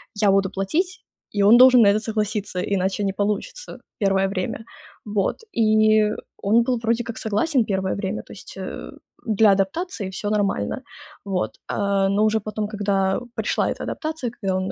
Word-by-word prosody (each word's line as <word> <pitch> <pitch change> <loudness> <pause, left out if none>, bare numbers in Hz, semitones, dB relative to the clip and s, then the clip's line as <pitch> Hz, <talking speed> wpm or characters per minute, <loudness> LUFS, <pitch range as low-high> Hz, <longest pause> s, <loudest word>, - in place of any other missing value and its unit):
я 205 -2 +3
буду 195 -1 +2
платить, 330 - -2 0.3
и 205 - -1
он 220 +4 +7
должен 255 -1 +8
на 200 - +6
это 210 +1 +3
согласиться, 210 -3 -2
иначе 190 +1 -1
не 195 -1 0
получится 210 - -3 0.2
первое 195 -1 +2
время. 190 +3 -3 0.4
Вот, 205 -2 0 0.2
и 215 -1 +4 0.3
он 225 +4 +3
был 250 -1 0
вроде 230 +1 0
как 230 -1 -7
согласен 225 +4 +1
первое 190 -2 -1
время, 200 +1 -3
то - - -11
есть, 190 - -11
э, 190 - -6 0.4
для 215 -1 +4
адаптации 200 - -1
всё 205 +2 -4
нормально. 200 - 0 0.5
Вот. 190 -2 -1 0.2
А, 200 -1 +1
но 205 +2 +2
уже 220 0 +2
потом, 215 0 -4
когда 195 -2 0 0.2
пришла - - 0
эта - - -4
адаптация, 310 -7 -4
когда 190 -1 0
он 185 0 -2
205 Hz, 165 wpm, -22 LUFS, 195-220 Hz, 0.5 s, должен